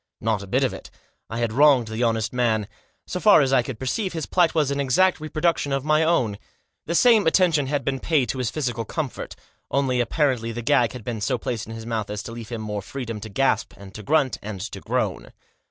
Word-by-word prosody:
Not 110 -3 0
a 100 - -9
bit 130 +8 +1
of 130 - 0
it. - - -10 0.4
I 115 - -4
had 115 -2 -1
wronged 135 -4 +5
the 110 +2 -4
honest 115 -2 0
man. 110 -4 +1 0.4
So 180 - -4
far 210 -4 +6
as 135 -1 +1
I 130 - +5
could 120 -1 -6
perceive, 185 - -2
his 160 -2 -3
plight 175 -3 +2
was 150 -3 +2
an 140 - -1
exact 150 +8 +3
reproduction 155 -1 -1
of 135 0 -1
my 155 +1 +3
own. 120 -11 +1 0.5
The 170 - -1
same 225 -3 +5
attention 160 -5 +3
had 140 -2 -2
been 135 -1 -1
paid 145 -5 +1
to 130 - -2
his 125 -3 0
physical 120 -3 -2
comfort; 140 +4 -5 0.3
only 130 -3 +1
apparently 120 -3 0
the 120 +1 -5
gag 125 -1 +3
had 125 -3 -8
been 115 -2 -4
so 125 +4 0
placed 115 -1 -4
in 115 - -7
his 115 0 -8
mouth 110 -3 -3
as 105 0 -4
to 115 - -7
leave 115 -1 -8
him 115 -2 -5
more 105 -1 -4
freedom 115 0 -6
to 110 - -8
gasp, 135 +7 0
and 100 -1 -12
to 110 - -8
grunt, 140 +2 +1
and 105 -2 -6
to 105 - -6
groan. - - -2
125 Hz, 235 wpm, -23 LUFS, 115-150 Hz, 0.5 s, far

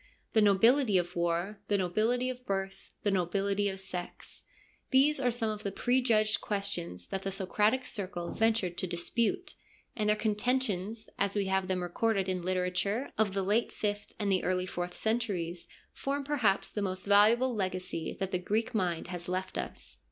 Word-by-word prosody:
The 220 - +5
nobility 215 +3 +5
of 175 0 -1
war, 175 +4 -1
the 205 - +2
nobility 220 +7 +1
of 250 0 -10
birth, 195 -2 -3
the 205 - +2
nobility 195 +2 +1
of 195 0 -6
sex: 180 -2 -7 0.5
these 280 +2 +4
are 250 -2 +2
some 230 -2 0
of 210 -1 -5
the 200 - -3
prejudged 230 -2 +2
questions 145 - -3
that 190 - -2
the 195 - -3
Socratic 210 +6 +1
Circle 185 -5 -4
ventured 220 -6 +1
to 185 - 0
dispute, 235 - -1 0.4
and 210 -1 0
their 210 - +5
con 215 0 0
tentions, 220 -2 -1
as 200 0 +1
we 200 -1 +1
have 190 0 +1
them 185 -1 -1
recorded 195 +2 0
in 185 -1 0
the 175 - -6
literature 185 +6 0
of 205 -3 +1
the 195 - +1
late 210 +5 +1
fifth 205 -1 -3
and 205 -2 0
the 185 - +2
early 185 0 0
fourth 175 -1 -4
centuries, 195 -7 -1 0.3
form 280 +1 -2
perhaps 250 -9 +1
the 210 - -3
most 185 -1 -1
valuable 220 +5 +5
legacy 185 -5 -3
that 195 -1 -2
the 180 - 0
Greek 215 +6 -1
mind 175 -5 -1
has 175 -1 -5
left 185 +1 -2
us. - - -5
200 Hz, 180 wpm, -31 LUFS, 185-225 Hz, 0.5 s, The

